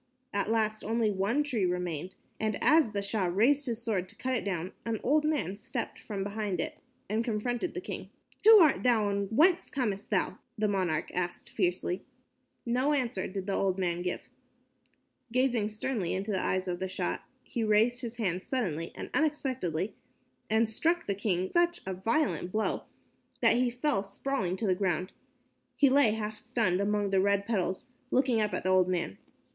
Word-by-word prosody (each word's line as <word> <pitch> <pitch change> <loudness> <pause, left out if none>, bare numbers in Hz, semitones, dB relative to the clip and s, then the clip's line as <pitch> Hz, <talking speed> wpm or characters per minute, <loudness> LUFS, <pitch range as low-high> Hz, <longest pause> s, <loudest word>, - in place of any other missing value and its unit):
At 200 +1 0
last 215 -1 0
only 225 0 +1
one 205 +9 +1
tree 250 -9 -1
remained, 180 -1 -2 0.2
and 215 -1 0
as 310 -5 +5
the 200 -1 -3
Shah 200 -1 0
raised 245 +11 +3
his 235 -1 -3
sword 195 -6 -1
to 225 - -11
cut 260 +3 -1
it 235 - -1
down, 185 -2 -2
an 225 -2 -2
old 300 +4 +3
man 290 - 0
stepped 230 +3 -5
from 200 -3 -4
behind 205 -2 -2
it - - -3 0.3
and 220 +3 0
confronted 240 +7 -2
the 370 - -3
king. 400 - -6 0.3
"Who 445 +1 +10
art 310 -4 +5
thou, 225 -5 +3
and 200 0 -1
whence 330 - +4
camest 210 -7 -2
thou?" - - 0 0.2
the 215 0 +1
monarch 185 -6 0
asked 175 -1 -3
fiercely. 180 -1 -1 0.6
No 255 +5 +2
answer 240 -9 -1
did 190 0 -5
the 200 - -1
old 190 -1 +1
man 175 -2 -1
make. 180 0 -3 1.0
Gazing 245 -4 +2
sternly 215 -3 -2
into 200 +3 -2
the 190 - 0
eyes 185 0 0
of 175 -1 -2
the 190 - -2
Shah, 185 - -2 0.2
he 235 - -3
raised 220 +3 +3
his 240 -1 -6
hand 185 -5 -1
suddenly 180 - -2
and - - -7
unexpectedly, 260 - 0 0.6
and 220 +1 +3
struck 330 +10 0
the 200 - 0
king 190 -2 -1
such 345 0 +2
a 190 - -2
violent 210 - 0
blow 215 +2 -1 0.6
that - - +5
he 250 0 +3
fell 250 -2 0
sprawling 195 -1 -2
to 220 - -2
the 190 - +3
ground. 185 -1 -1 0.6
He 280 -3 +4
lay 265 -6 +5
half 215 -1 -4
stunned 195 -6 0
among 205 0 0
the 190 -1 +4
red 200 0 +2
petals, 190 -3 -1 0.2
looking 255 -4 +2
up 210 -1 0
at - - -3
the 185 - +1
old 185 -1 +5
man. 170 - -2
210 Hz, 185 wpm, -30 LUFS, 185-245 Hz, 1.0 s, Who